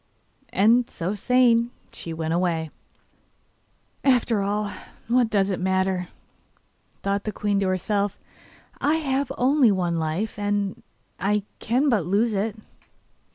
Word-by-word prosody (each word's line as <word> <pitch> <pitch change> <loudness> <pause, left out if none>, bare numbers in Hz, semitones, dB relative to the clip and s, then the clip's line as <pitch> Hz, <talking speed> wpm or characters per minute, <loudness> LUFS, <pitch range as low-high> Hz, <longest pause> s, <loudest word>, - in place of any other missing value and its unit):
And, 230 +4 +3
so 180 +4 -3
saying, 235 +2 +3 0.2
she 165 - -7
went 160 0 -2
away. 165 -3 0 1.3
'After 245 -5 +3
all, 205 +1 -1 0.4
what 240 0 +3
does 200 -2 +2
it 185 - -2
matter?' 190 -1 0 1.0
thought 200 0 0
the 215 - -2
queen 205 -1 0
to 195 - +1
herself, 200 +2 0 0.6
'I 295 +3 +2
have 280 -3 -1
only 260 -2 +4
one 175 -3 0
life, 165 +8 -2
and 205 -1 -1 0.4
I 205 +1 +1 0.2
can 255 +6 +1
but 210 - +2
lose 215 +5 +2
it. 205 +1 -1
205 Hz, 125 wpm, -24 LUFS, 190-235 Hz, 1.3 s, only